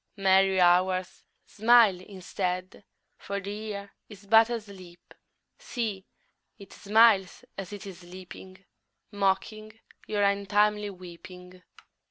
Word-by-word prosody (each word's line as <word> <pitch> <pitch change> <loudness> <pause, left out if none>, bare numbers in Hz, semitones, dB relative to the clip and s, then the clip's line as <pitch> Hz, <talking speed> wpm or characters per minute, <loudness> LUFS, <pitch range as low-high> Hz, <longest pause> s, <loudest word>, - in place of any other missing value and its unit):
Merry 190 -1 +3
Hours, 185 +1 +2 0.2
smile 220 -3 +4
instead, 185 0 -5 0.4
For 200 0 -5
the 200 +1 -7
Year 205 -2 -7 0.2
is 205 -2 -14
but 225 +2 +5
asleep. 200 -7 -9 0.5
See, 215 -6 -5 0.5
it 200 -2 -14
smiles 210 -2 +3
as 195 -1 -7
it 205 +1 -9
is 190 -3 -10
sleeping, 185 +1 -12 0.6
_5 205 - -10
Mocking 215 +3 -2 0.3
your 205 -1 -1
untimely 205 +1 +1
weeping. 180 0 -13
195 Hz, 110 wpm, -27 LUFS, 185-210 Hz, 0.6 s, but